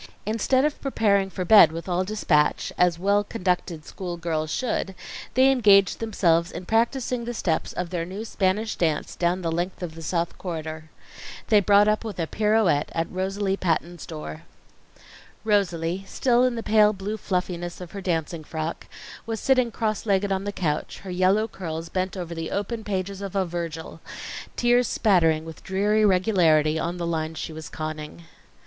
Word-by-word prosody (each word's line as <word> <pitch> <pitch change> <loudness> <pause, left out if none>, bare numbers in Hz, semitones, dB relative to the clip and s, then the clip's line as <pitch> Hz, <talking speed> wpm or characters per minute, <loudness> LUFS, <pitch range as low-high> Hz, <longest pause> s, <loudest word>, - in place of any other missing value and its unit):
Instead 230 +6 +2
of 300 - -2
preparing 200 -7 +2
for 185 -1 -4
bed 190 -4 +8
with 165 +2 -7
all 180 0 +1
dispatch, 180 -7 +1
as 180 -2 +3
well 200 +3 +2
conducted 180 -6 -2
school 175 -2 -6
girls 160 -2 -2
should, 205 -3 -2 0.4
they 260 +1 +6
engaged 205 -7 +5
themselves 175 -6 +1
in 175 +2 -7
practising 235 +3 0
the 240 0 -4
steps 165 -7 -1
of 180 -1 -4
their 175 -2 -1
new 190 +6 -6
Spanish 210 +1 0
dance 160 -3 -1
down 180 +1 0
the 165 - -1
length 175 +3 -3
of 165 -3 -5
the 165 - -10
South 170 +1 -2
Corridor. 160 -3 -5 0.6
They 215 -2 +6
brought 205 +1 +5
up 215 +1 +1
with 215 -4 -6
a 165 - +1
pirouette 210 -6 +2
at 165 0 -1
Rosalie 195 +1 -1
Patton's 170 -1 -2
door. 75 0 -7 1.0
Rosalie, 190 -4 0
still 245 +2 +2
in 250 -1 0
the 230 - -4
pale 215 -1 +4
blue 200 +2 -4
fluffiness 180 -4 -3
of 180 -2 -9
her 200 - -6
dancing 165 -3 -2
frock, 160 +1 -5 0.4
was 225 -1 -3
sitting 255 -3 +3
cross 220 -1 -2
legged 200 0 +2
on 190 0 -1
the 205 - -2
couch, 155 -7 -3
her 190 - -6
yellow 185 +4 +2
curls 165 -5 -6
bent 185 +1 -2
over 175 -2 -5
the 165 -1 -4
open 220 +3 -3
pages 195 -1 -3
of 200 -1 -6
a 195 -1 +2
Virgil, 165 -2 -6 0.5
tears 245 0 +3
spattering 165 -6 +2
with 160 -1 -10
dreary 205 +3 +1
regularity 175 -6 +3
on 170 +2 -2
the 170 - -3
lines 160 -1 -2
she 160 - -5
was 155 -1 -8
conning. 155 +1 -6
185 Hz, 175 wpm, -25 LUFS, 165-210 Hz, 1.0 s, bed